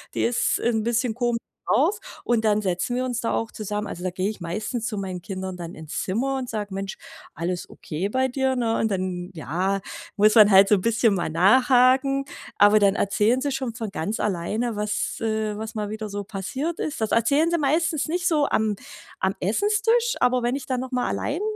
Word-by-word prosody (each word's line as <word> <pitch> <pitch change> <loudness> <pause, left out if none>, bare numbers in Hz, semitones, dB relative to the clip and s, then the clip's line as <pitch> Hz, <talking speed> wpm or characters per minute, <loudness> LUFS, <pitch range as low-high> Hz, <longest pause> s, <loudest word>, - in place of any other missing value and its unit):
Die - - 0
ist 235 0 +1
'n 225 -2 0
bisschen 235 +1 0
komisch 240 -1 0 0.3
drauf.“ 355 +10 +3 0.2
Und 230 -2 +1
dann 215 0 +3
setzen 185 +6 -1
wir 255 +1 0
uns 245 -2 -2
da 230 - -1
auch 225 - -2
zusammen. 210 0 -4
Also, 180 - -7
da 185 - 0
gehe 185 +2 -2
ich 215 - -7
meistens 215 +7 -3
zu 215 - -4
meinen 185 -2 -4
Kindern 190 0 -5
dann 170 -1 -7
ins 160 -1 -5
Zimmer 265 +8 -1
und 255 -2 -4
sage: 205 -3 -4
„Mensch, 195 0 -4 0.4
alles 175 +2 -3
okay 175 +6 -4
bei 260 +4 +1
dir“, 265 0 0
ne? 230 -2 0
Und 220 - +1
dann 185 -2 -3
ja, 185 +5 -1 0.4
muss 215 +1 +5
man 215 -2 +8
halt 195 0 +7
so 210 - +5
bisschen 225 +2 +2
mal 175 -4 -1
nachhaken. 255 - +4 0.3
Aber 205 +1 +6
dann 200 -1 +3
erzählen 210 +6 +2
sie 285 +1 -1
schon 260 -4 -3
von 225 -3 -4
ganz 200 +5 -3
alleine, 210 +5 -1
was 210 0 -2
äh, 220 -1 -1
was 220 0 -6
mal 210 -1 -3
wieder 215 0 -5
so 205 0 -4
passiert 260 - -4
ist. 305 -5 -3
Das 220 - 0
erzählen 280 +9 +3
Sie 340 - +2
meistens 310 +1 +1
nicht 355 +3 -1
so 300 -5 +2
am 215 -1 +1 0.4
am 190 +1 0
Essenstisch, 425 - +1
aber 250 0 +3
wenn 240 +2 0
ich 275 - -5
dann 255 -2 -1
noch 260 +1 -5
mal 250 -1 0
allein, 310 +7 -2
220 Hz, 210 wpm, -24 LUFS, 195-260 Hz, 0.4 s, man